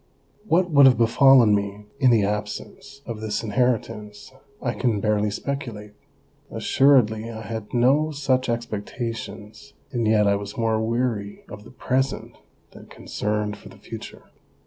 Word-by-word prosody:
What 180 -1 +2
would 140 -2 +7
have 125 -4 +4
befallen 120 0 +5
me 100 0 -2
in 130 - +5
the 115 -4 +4
absence 105 +7 -5
of 115 -3 -6
this 110 0 -3
in 110 - -4
heritance 110 -2 -2 0.3
I 120 -3 -2
can 120 -6 0
barely 105 0 +1
speculate; 110 -3 -5 0.6
assuredly 115 -5 +2
I 110 -1 -7
had 110 -1 -6
no 135 +6 +3
such 135 -4 0
expectations, 115 +1 -5 0.2
and 120 -4 -1
yet 110 -1 +4
I 100 0 +3
was 100 0 -8
more 110 -1 +1
weary 110 -3 -2
of 105 0 -10
the - - -12
present 130 +1 -2 0.4
than - - -14
concerned 105 0 -3
for - - -14
the - - -15
future. - - -10
115 Hz, 145 wpm, -23 LUFS, 105-130 Hz, 0.6 s, would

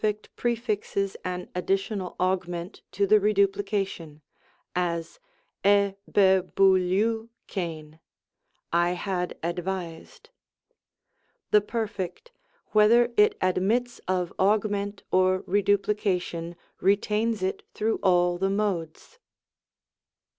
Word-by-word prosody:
prefixes 215 -4 -1
an 180 0 -4
additional 195 +1 -2
Augment 180 0 -2
to 200 +2 +1
the 210 +2 +5
Reduplication; 195 -6 0 0.5
as, 170 - -2 0.4
i'^b'fiovXtV'XtcVy 195 -3 +1 0.4
" - - -48
I 175 +1 +3
had 180 -1 -3
advised." 175 - -5 1.2
The 210 - +6
Perfect, 220 - -4 0.4
whether 235 +3 +5
it 210 -1 +4
admits 210 +7 0
of 180 -2 -1
Augment 205 0 +1
or 185 0 +3
Re 205 +2 +2
duplication, 195 -4 0 0.2
retains 210 +2 +1
it 190 - -1
through 220 +1 0
all 175 -2 +3
the 195 +1 +1
Modes. 195 - -3
195 Hz, 85 wpm, -26 LUFS, 180-210 Hz, 1.2 s, The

